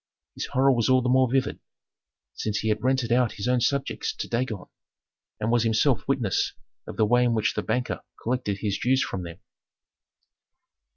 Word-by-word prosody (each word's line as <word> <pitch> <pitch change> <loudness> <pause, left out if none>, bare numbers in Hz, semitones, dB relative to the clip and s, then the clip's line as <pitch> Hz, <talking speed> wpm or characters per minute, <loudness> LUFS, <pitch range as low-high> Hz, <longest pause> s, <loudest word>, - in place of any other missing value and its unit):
His - - -4
horror 135 +2 +3
was 120 -2 +1
all 130 -1 +4
the 125 - 0
more 130 -1 +3
vivid, 135 0 0 0.7
since 105 -1 -2
he 110 - -1
had 105 0 0
rented 130 -2 +1
out 120 -1 +3
his 105 - -4
own 125 -1 +2
subjects 140 +2 -1
to - - -5
Dagon, 115 -5 -2 0.7
and 110 +2 0
was 120 -1 +3
himself 115 +3 +2
witness 125 -9 0 0.3
of - - -8
the 110 - +4
way 120 +3 +4
in 120 -1 +2
which 110 - +1
the - - -2
banker 125 0 -2 0.2
collected 115 -5 -2
his 100 -2 -1
dues 130 +2 +2
from 95 - -4
them. 85 -1 -8
120 Hz, 180 wpm, -26 LUFS, 110-130 Hz, 0.7 s, all